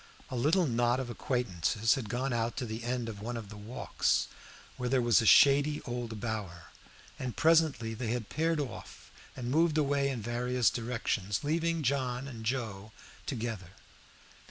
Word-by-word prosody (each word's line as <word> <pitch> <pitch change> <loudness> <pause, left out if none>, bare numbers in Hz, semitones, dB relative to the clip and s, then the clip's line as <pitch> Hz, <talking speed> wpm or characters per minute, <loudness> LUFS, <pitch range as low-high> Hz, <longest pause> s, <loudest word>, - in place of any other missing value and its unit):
A - - -3
little 160 +9 +3
knot 120 -1 +2
of 125 -2 -4
acquaintances 115 - 0
had 130 -7 -4
gone 125 +3 -1
out 115 0 -1
to 125 - -2
the 110 0 -5
end 120 -1 -2
of 105 -3 -7
one 120 +2 -4
of 110 -3 -7
the 105 - -9
walks, 105 +4 -1 0.5
where 125 -1 -3
there 130 0 +3
was 120 -1 +4
a 115 - 0
shady 145 +2 +6
old 120 -3 -5
bower, 95 -8 -5 0.5
and 125 -2 -4
presently 155 -9 +3
they 115 +1 -4
had 115 -1 -2
paired 160 +6 0
off 140 -3 -7 0.2
and 125 -1 -4
moved 160 +1 +3
away 140 -2 +2
in 130 -3 -3
various 120 +1 +1
directions, 115 -4 -2
leaving 165 +2 0
John 130 -1 -1
and 115 -5 -8
Joe 110 -4 -3 0.4
together. 110 - -4
120 Hz, 165 wpm, -31 LUFS, 110-135 Hz, 0.5 s, shady